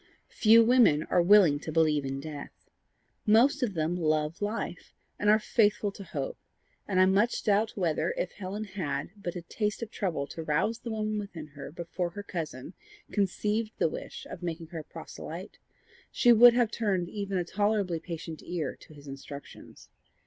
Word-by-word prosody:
Few 225 +1 +6
women 225 -11 +5
are 175 - +5
willing 175 -5 +6
to 155 - -6
believe 155 -3 +2
in 135 0 -3
death. 145 0 -9 0.6
Most 250 +7 +5
of 220 -7 -1
them 160 +2 0
love 155 -1 0
life, 210 +2 -4 0.2
and 210 - +2
are 215 - +7
faithful 210 -1 +2
to 200 - -10
hope; - - -5 0.5
and 190 -2 +1
I 185 - +7
much 200 +5 +2
doubt 210 +1 +2
whether, 170 -5 0
if - - -2
Helen 205 +2 -5
had 175 -8 -4
but 185 -3 -6
had 175 - -5
a - - -44
taste 210 +1 -2
of 225 - -7
trouble 170 -8 -2
to 165 - -7
rouse 160 +9 0
the 235 - -7
woman 215 -1 -2
within 170 -7 -7
her 140 -1 -9
before 175 +2 -4
her 205 +4 -8
cousin 160 -5 -6 0.4
conceived 210 +2 0
the - - +2
wish - - -7
of - - -9
making 165 -2 -5
her 170 -2 -6
a - - -7
proselyte, - - -9 0.5
she 240 -1 +5
would 240 +1 +8
have 240 -3 +2
turned 195 -6 0
even 200 0 -3
a 175 - -1
tolerably 205 -3 0
patient 165 -1 -7
ear 165 -6 -3
to 155 - -16
his 145 0 -14
instructions. 140 +1 -10
185 Hz, 180 wpm, -29 LUFS, 160-210 Hz, 0.6 s, would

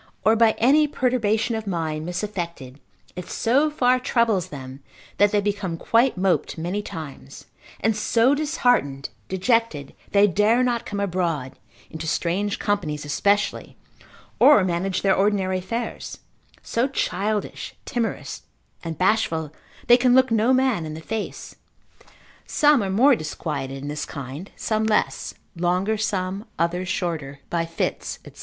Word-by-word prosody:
or 220 - +5
by 225 -1 +4
any 290 +6 +4
perturbation 240 -4 0
of 220 -2 -4
mind, 160 -3 -2
misaffected, 175 -8 -5 0.4
it 180 0 -7
so 275 +7 +2
far 255 -4 +2
troubles 230 -7 +1
them, 130 -2 -9 0.4
that 205 0 +5
they 210 - +3
become 200 -4 -2
quite 230 +5 +2
moped 185 -2 0
many 175 +6 -2
times, 145 - -9 0.4
and 220 -1 +2
so 230 +4 +3
disheartened, 245 - +1 0.2
dejected, 190 - 0 0.2
they 200 0 +5
dare 210 +6 +3
not 240 -1 -1
come 205 - -4
abroad, 170 -9 -1 0.4
into 160 0 -6
strange 185 +5 -1
companies 155 -8 -2
especially, 200 +8 0 0.6
or 290 -10 +7
manage 185 +1 -1
their 195 -1 +4
ordinary 195 -2 +1
affairs, 230 +5 -5 0.5
so 235 +3 0
childish, 210 -5 -2
timorous, 235 -4 -3 0.4
and 165 -2 -5
bashful, 165 -6 +1 0.3
they 240 - +7
can 250 0 +4
look 260 -1 +4
no 225 +2 +3
man 260 -8 +2
in 155 -1 -6
the - - -7
face; 215 +6 -5 0.9
some 295 -4 +4
are 195 - -2
more 250 +8 +5
disquieted 145 -5 -4
in 140 +1 -7
this 150 0 -3
kind, 140 +6 -7
some 215 0 -1
less, 220 -1 0 0.2
longer 180 +5 +1
some, 195 -1 -2
others 175 +2 -1
shorter, 160 -9 -3
by 165 -1 0
fits, 165 - -3
&c. - - -11
200 Hz, 140 wpm, -23 LUFS, 165-230 Hz, 0.9 s, or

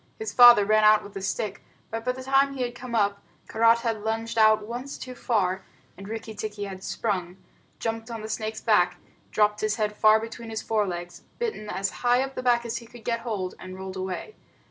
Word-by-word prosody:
His 440 0 -5
father 240 -4 +9
ran 215 +1 +4
out 215 0 +6
with 200 - -12
a 195 - -4
stick, 195 +1 -3 0.3
but 225 0 -4
by 250 +1 0
the 260 0 -8
time 275 +1 +3
he 250 -2 -2
came 240 0 -7
up, 200 -2 +1 0.3
Karait 230 +1 +4
had 225 -3 -2
lunged 225 +1 -2
out 215 -1 +5
once 245 +5 -6
too 255 - -7
far, 190 -6 0 0.3
and 195 +1 -10
Rikki 225 0 -6
tikki 210 -1 -5
had 190 -1 -7
sprung, 185 -5 -2 0.4
jumped 225 0 -3
on 225 -2 -6
the - - -5
snake's 220 0 -4
back, 180 -5 +3 0.3
dropped 210 0 +2
his 215 0 +1
head 210 -2 -1
far 215 +1 +5
between 225 +1 -7
his 220 0 -4
forelegs, 180 -5 -2 0.2
bitten 435 - -3
as 195 -1 -1
high 245 +1 +3
up 270 0 -6
the - - -4
back 240 -1 +2
as 235 0 -3
he 235 - -9
could 235 0 -14
get 230 -1 0
hold, 205 -6 -3
and 185 0 -8
rolled 190 0 -7
away. 190 - -5
220 Hz, 210 wpm, -26 LUFS, 205-235 Hz, 0.4 s, father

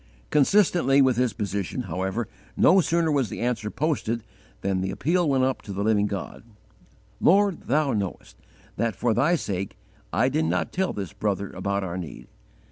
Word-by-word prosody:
"_ - - -34
Consistently 150 -3 +4
with 130 -3 +4
his 125 0 +1
position, 100 +2 -3
however, 95 +3 -2 0.3
no 190 +3 +6
sooner 165 -1 +1
was 135 -7 +1
the - - -6
answer 115 -3 -1
posted 120 -6 -1 0.4
than 95 -1 0
the 95 - -2
appeal 165 - +1
went 135 -2 +2
up 130 0 0
to 105 - -9
the 100 +1 -2
Living 105 -1 +2
God: 100 -3 -6 0.8
"Lord, 200 0 +3
thou 145 0 +2
knowest 100 -4 -4 0.4
that, 115 0 0
for 120 -2 +1
Thy 145 +10 +3
sake, 100 - -4 0.3
I 125 - +2
did 155 +4 +1
not - - -1
tell 190 +1 0
this 95 -6 -5
brother 100 -1 -2
about 100 0 -2
our 90 -1 -4
need. 85 -4 -8
120 Hz, 175 wpm, -25 LUFS, 100-150 Hz, 0.8 s, no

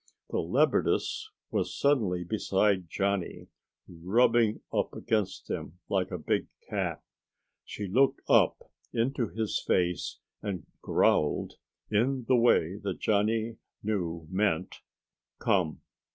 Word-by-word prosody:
The - - 0
leopardess 435 +2 +1 0.2
was - - -1
suddenly 110 -11 +2
beside 95 -2 +1
Johnny, 100 0 -2 0.4
rubbing 110 +6 +2
up - - 0
against 105 -4 -1
him 90 - -5
like 95 -1 +1
a 90 - -3
big 80 - -1 0.2
cat. - - -2 0.6
She 105 - -5
looked 130 +9 +3
up - - +3 0.2
into 120 +1 0
his 110 0 -2
face 90 -2 0 0.2
and 95 -6 -4 0.2
growled 75 - +1 0.3
in 125 +4 +1
the 130 - +5
way 100 -7 +3
that 100 -3 -4
Johnny 110 +2 +1 0.3
knew 85 -6 -2
meant 95 -3 0 0.6
"come." 85 -6 +1
100 Hz, 110 wpm, -29 LUFS, 90-115 Hz, 0.6 s, the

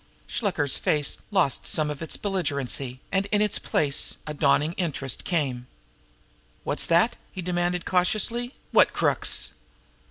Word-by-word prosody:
Shluker's 165 - -1
face 145 -2 +1
lost 185 - +1
some 150 -1 +1
of 145 - -7
its 160 - -3
belligerency, 140 -9 -2
and 195 0 +1
in 205 0 +1
its 210 -1 +2
place 140 -2 +1
a 150 - -4
dawning 150 +2 +2
interest 140 -8 -3
came. 130 -8 -1 1.0
"What's - - +1
that?" 175 +8 +3
he 185 - -6
demanded 175 0 -1
cautiously. 220 +7 +1 0.2
"What - - +5
crooks?" - - +1
170 Hz, 130 wpm, -25 LUFS, 145-195 Hz, 1.0 s, What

